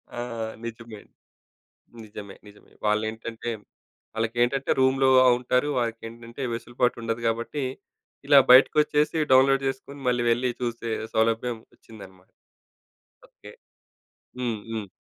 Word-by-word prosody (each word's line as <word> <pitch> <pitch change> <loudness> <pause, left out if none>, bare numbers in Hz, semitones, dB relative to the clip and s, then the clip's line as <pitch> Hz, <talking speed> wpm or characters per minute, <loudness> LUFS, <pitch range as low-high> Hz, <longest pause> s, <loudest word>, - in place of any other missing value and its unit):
ఆ! - - -5 0.5
నిజమే. 115 -2 -8 1.1
నిజమే 105 -2 -10
నిజమే. 105 0 -18
వాళ్ళేంటంటే, 110 +2 -2 0.6
వాళ్ళకేంటంటే, 120 +4 0
రూమ్‌లో 130 0 +3 0.3
ఉంటారు. 125 +3 0
వాళ్ళకేంటంటే 115 +2 -5
వెసులుబాటు 120 +1 -1
ఉండదు 115 0 -3
గాబట్టి 115 +5 -2 0.6
ఇలా 140 -1 +7
బయటికొచ్చేసి 150 +4 +5
డౌన్‌లోడ్ 135 +1 +5
జేసుకొని 140 +2 -7
మళ్ళీ 120 -1 +1
వెళ్లి 125 +2 +1
చూసే 115 -1 -3 0.2
సౌలభ్యం 115 +1 0 0.2
వచ్చిందన్నమాట. 95 -4 -15 1.0
ఓకే. - - -15 0.9
హ్మ్. 120 -4 -2
హ్మ్. 110 -3 -5
115 Hz, 95 wpm, -25 LUFS, 115-130 Hz, 1.1 s, ఇలా